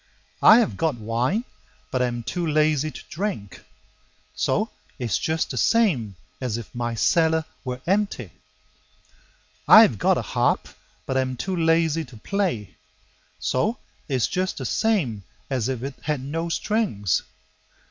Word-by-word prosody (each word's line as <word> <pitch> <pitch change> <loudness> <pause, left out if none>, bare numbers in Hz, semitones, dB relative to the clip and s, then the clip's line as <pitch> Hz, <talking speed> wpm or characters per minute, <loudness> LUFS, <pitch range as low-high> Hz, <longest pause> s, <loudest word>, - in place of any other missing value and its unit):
I 215 - +9
have 235 -3 +1
got 160 -4 +1
wine, 120 - -1 0.5
but 130 - 0
am 120 -1 -1
too 165 +10 -2
lazy 155 -1 +2
to - - -9
drink; 160 - -4 0.7
So 205 - 0 0.3
it's 120 - -1
just 160 0 -1
the - - -5
same 155 - +2 0.3
as 120 -3 -1
if 105 -6 -9
my 120 -1 -2
cellar 160 +5 +2 0.2
were 125 -1 -5
empty. 190 - 0 1.4
I - - +10
have - - +1
got - - +3
a - - -2
harp, - - 0 0.4
but 130 - -1
am 130 -1 -1
too 190 +8 -2
lazy 165 -1 +2
to 125 -3 -14
play; 145 - -2 0.6
So - - 0 0.3
it's 130 -4 +2
just 185 +1 -2
the - - -4
same 160 - 0 0.3
as 130 -2 0
if 130 -2 -3
it 135 0 -4
had 150 -3 -2
no 165 +5 -3
strings. 175 - 0
145 Hz, 145 wpm, -24 LUFS, 120-170 Hz, 1.4 s, I